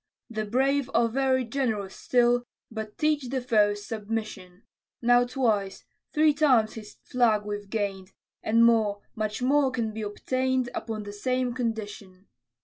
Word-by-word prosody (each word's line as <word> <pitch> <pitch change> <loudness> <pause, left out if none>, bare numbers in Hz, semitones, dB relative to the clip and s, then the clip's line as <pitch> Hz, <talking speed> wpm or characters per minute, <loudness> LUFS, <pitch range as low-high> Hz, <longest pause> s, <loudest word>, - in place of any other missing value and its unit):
The 215 -1 -2
brave 270 +4 +1
are 235 - +4
very 260 +1 +1
generous 225 -6 -2
still 245 0 +2 0.2
But 220 -1 -6
teach 300 -4 +1
the 265 +1 -1
foes 210 -4 +2
submission: 215 -4 -5 0.4
Now 245 0 +4
twice 215 -7 -1 0.3
three 305 0 +4
times 260 -8 +3
his 215 -2 -10
flag 225 -4 +2
we've 205 -1 -5
gain'd, 200 -3 -3 0.3
And 230 +1 +4
more, 215 -3 +2
much 215 +1 -3
more 275 +1 +3
can 230 -4 -2
be 220 - -5
obtain'd 255 +4 -1
Upon 220 -2 -4
the 205 0 -8
same 255 +3 -1
condition. 210 -5 -5
225 Hz, 140 wpm, -27 LUFS, 210-255 Hz, 0.4 s, are